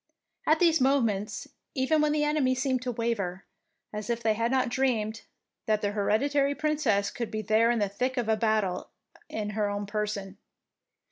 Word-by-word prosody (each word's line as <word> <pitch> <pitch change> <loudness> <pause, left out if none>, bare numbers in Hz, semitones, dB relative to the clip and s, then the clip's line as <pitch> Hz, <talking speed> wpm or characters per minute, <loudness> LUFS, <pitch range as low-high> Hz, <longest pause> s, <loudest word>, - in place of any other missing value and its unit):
At 310 - +5
these 330 -3 +4
moments 225 -5 +1 0.3
even 295 +4 +2
the 300 0 +1
enemy 295 -4 +2
seemed 260 -1 0
to 255 -1 -2
waver, 215 -6 -2 0.5
as 210 0 -5
if 235 0 -1
they 220 -1 +3
had 230 +2 0
not 260 0 +2
dreamed 230 -4 0 0.5
that 215 -1 +2
their 205 - 0
hereditary 275 +8 +1
Princess 280 -10 +1
could 235 -2 -4
be 215 0 -3
there 220 +2 +3
in 240 - +2
the 205 -2 +1
thick 255 +7 -2
of 245 - +1
battle 215 -5 0 0.4
in 210 -1 -3
her 210 -1 0
own 205 0 -3
person. 205 -2 -3
230 Hz, 165 wpm, -28 LUFS, 210-265 Hz, 0.5 s, At